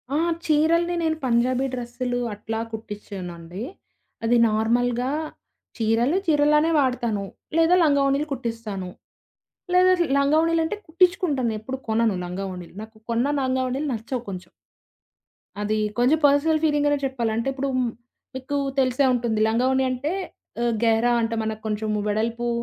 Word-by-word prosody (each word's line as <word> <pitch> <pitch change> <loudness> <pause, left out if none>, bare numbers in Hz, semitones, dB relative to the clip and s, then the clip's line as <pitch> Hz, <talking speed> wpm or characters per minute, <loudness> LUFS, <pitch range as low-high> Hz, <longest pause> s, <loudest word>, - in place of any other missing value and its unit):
ఆహ్, 335 +1 +1
చీరల్ని 335 +3 +2
నేను 320 -1 0
పంజాబీ 250 +2 +2
డ్రెస్సులు 245 0 -3 0.2
అట్లా 220 +2 -4
కుట్టించనండి. 195 -4 -7 0.6
అది 240 +1 +4
నార్మల్‌గా 240 +3 +1 0.7
చీరలు 230 +9 +2
చీరలానే 300 +1 +4
వాడతాను. 235 -6 0 0.3
లేదా 330 +2 +5
లంగావోణీలు 280 0 +2
కుట్టిస్తాను. 225 -7 -5 0.8
లేదా 365 0 +6 0.3
లంగావోణీలంటే, 320 +6 +2
కుట్టించుకుంటానేప్పుడూ 270 - 0
కొనను 220 -2 +2
లంగావోణీలు. 180 -1 -6
నాకు 220 0 -14
కొన్న 235 +3 +1 0.2
లంగావోణీలు 260 +2 -1
నచ్చవు 235 +2 -4
కొంచెం. 185 -1 -7 1.1
అది 215 +1 0 0.2
కొంచెం 265 +6 +4
పర్సనల్ 305 +2 +2
ఫీలింగనే 290 -1 +2
చెప్పాలి. 240 -4 -1
అంటే 230 +4 -2
ఇప్పుడు 275 +1 -2 0.7
మీకు 265 +2 -3 0.2
తెలిసే 260 +1 +2
ఉంటుంది 235 -3 0
లంగావోణి 260 +4 +2
అంటే, 275 +6 -2 0.5
ఆహ్, 240 -1 +1
గెహరా 230 +1 +3
అంటే 230 0 -1
మనకు 220 0 -4
కొంచెం 215 0 -1
వెడల్పు 230 +3 -1
245 Hz, 115 wpm, -24 LUFS, 220-290 Hz, 1.1 s, లేదా